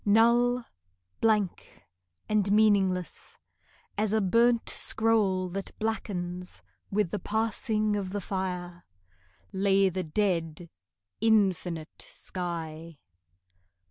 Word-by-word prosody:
Null, 235 +3 +4 0.5
blank, 205 - 0 0.4
and 210 -2 +1
meaningless 200 -4 +2 0.6
As 215 -1 +1
a 220 - +3
burnt 230 +4 +3
scroll 210 -5 +1
that 195 +2 -6
blackens 180 -5 -4 0.3
With 205 -3 0
the 210 - -2
passing 215 -1 0
of 200 -2 -2
the 205 +2 -3
fire, 180 -2 -4 0.7
Lay 195 0 +3
the 185 +1 -3
dead 170 -2 -1 0.5
infinite 185 -7 +1
sky. 165 -3 -6
195 Hz, 90 wpm, -28 LUFS, 180-215 Hz, 0.7 s, Null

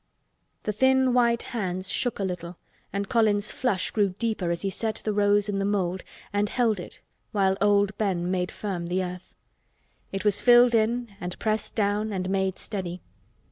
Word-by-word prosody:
The 210 - -1
thin 260 +2 +3
white 235 -1 +3
hands 185 -4 -2
shook 245 -3 0
a 200 - -2
little 180 -2 -4 0.3
and 200 0 -2
Colin's 215 -2 +2
flush 205 -8 -1
grew 200 -4 +1
deeper 215 -6 -1
as 170 +2 -1
he 195 - -1
set 220 +3 -2
the 215 - 0
rose 205 0 +3
in 200 -1 -1
the - - 0
mould 190 -2 -1 0.3
and 205 0 +1
held 225 -5 +1
it 175 - -9 0.3
while 190 -2 +2
old 205 0 +3
Ben 180 -4 0
made 180 -1 -1
firm 185 -5 -4
the 185 +2 0
earth. 180 0 -8 0.8
It 195 +1 -4
was 205 -1 +3
filled 240 0 +6
in 230 0 +1
and 180 0 -5
pressed 215 -1 -2
down 210 0 0
and 185 -1 -2
made 190 -1 0
steady. 185 -4 -5
205 Hz, 180 wpm, -26 LUFS, 185-220 Hz, 0.8 s, filled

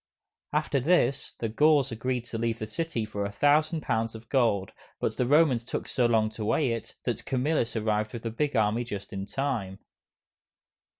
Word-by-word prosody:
After 150 -1 +1
this, 140 -2 +1
the 115 - -2
Gauls 145 +3 +3
agreed 125 +2 -2
to 115 -2 -5
leave 115 0 0
the 110 - -4
city 115 +1 -3
for 105 -1 -4
a 100 - -3
thousand 150 +7 +3
pounds 115 -3 -1
of 110 0 -11
gold, 115 -8 +2 0.3
but - - -1
the 125 - 0
Romans 145 -4 +4
took 120 - -4
so 125 -2 +2
long 110 -2 +2
to 110 0 -6
weigh 125 +5 +2
it, 115 -1 -5
that - - -2
Camillus 130 -2 0
arrived 110 -1 0
with 120 -1 -7
a 115 - -1
big 145 +4 -1
army 110 +2 +2
just 100 -4 -7
in 95 0 -4
time. 120 -9 -2
115 Hz, 185 wpm, -28 LUFS, 110-140 Hz, 0.3 s, Romans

